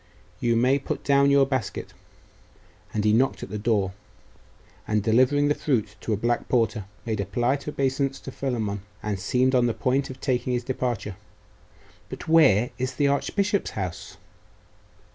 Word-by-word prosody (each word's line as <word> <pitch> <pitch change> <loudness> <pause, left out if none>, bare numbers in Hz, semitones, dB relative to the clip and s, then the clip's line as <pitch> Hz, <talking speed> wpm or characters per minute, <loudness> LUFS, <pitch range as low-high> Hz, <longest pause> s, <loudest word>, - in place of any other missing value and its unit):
You 120 -1 +1
may 130 +4 +3
put 140 - -4
down 140 0 +4
your 140 -1 +5
basket.' 130 -5 -3 1.0
And 105 -1 -1
he 105 - +4
knocked 130 +4 +2
at - - -8
the 105 - -3
door, 105 -3 +1 1.0
and 105 -1 +1
delivering 130 +6 +3
the 145 - +3
fruit 110 -9 -1
to - - -3
a 105 - +1
black 120 +3 -1
porter, 115 -4 +1 0.2
made 110 -3 -2
a 100 - -1
polite 120 +9 -1
obeisance 135 -1 -1
to 135 - -7
Philammon, 110 -8 -2 0.2
and 105 -2 -2
seemed 125 +7 +1
on 125 -1 +4
the 115 - -1
point 135 +2 0
of 130 0 -9
taking 125 -1 -1
his 120 0 -1
departure. 120 -6 -3 0.9
'But - - -8
where 135 -9 +5
is 130 +1 -2
the 145 -1 +2
archbishop's 195 +9 0
house? 90 -1 -5
125 Hz, 160 wpm, -25 LUFS, 110-135 Hz, 1.0 s, your